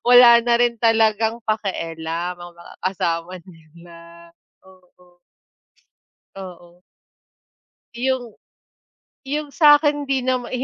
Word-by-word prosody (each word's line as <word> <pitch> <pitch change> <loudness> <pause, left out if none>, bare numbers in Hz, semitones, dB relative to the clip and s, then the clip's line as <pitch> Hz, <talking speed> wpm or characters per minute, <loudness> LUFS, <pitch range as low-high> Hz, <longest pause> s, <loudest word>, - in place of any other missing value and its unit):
wala 245 -1 +8
na 235 0 +1
rin 240 -1 0
talagang 225 0 +2
pakialam, 170 -5 -4
ang 175 0 -11
mga 170 - -15
kasama 175 -1 -3
nila, 170 0 -17 0.3
oo. 180 -1 -24 1.2
Oo. 175 -2 -12 1.1
Yung 245 -1 -3 0.9
yung 295 +2 -4
sa'kin 295 -2 +4
'di 270 -1 -1
nama 255 -2 -1
195 Hz, 90 wpm, -20 LUFS, 175-245 Hz, 1.2 s, wala